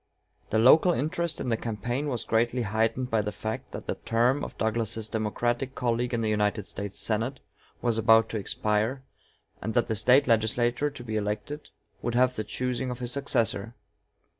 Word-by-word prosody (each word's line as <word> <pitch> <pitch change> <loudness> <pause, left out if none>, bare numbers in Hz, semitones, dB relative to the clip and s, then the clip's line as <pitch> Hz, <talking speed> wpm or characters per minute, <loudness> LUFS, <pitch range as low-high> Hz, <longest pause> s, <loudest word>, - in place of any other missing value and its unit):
The 110 - +1
local 155 +10 +6
interest 160 +4 -1
in - - -3
the 115 - +1
campaign 120 +6 -3
was 125 -6 -2
greatly 120 +2 +1
heightened 115 +4 0
by 110 -1 +3
the 105 0 -3
fact 110 +1 -5
that - - -7
the - - -1
term 120 +5 +1
of - - -7
Douglas's 110 0 -1
Democratic 120 +4 -1
colleague 120 0 0
in 120 -2 0
the 110 - 0
United 105 -1 0
States 100 0 -6
Senate 115 +5 -1 0.4
was 115 -2 +2
about 110 0 +5
to 110 - -2
expire, 110 +6 -1 0.6
and 110 - -3
that 120 - +3
the 110 - -1
State 125 +6 +4
legislature 120 +4 +2
to 125 - -10
be 110 -2 -3
elected 105 +8 -4 0.3
would 120 -1 -2
have 130 +1 +3
the 110 - -2
choosing 125 +4 -2
of 125 - -4
his 120 -1 -4
successor. 120 -5 -1
115 Hz, 180 wpm, -27 LUFS, 110-125 Hz, 0.6 s, local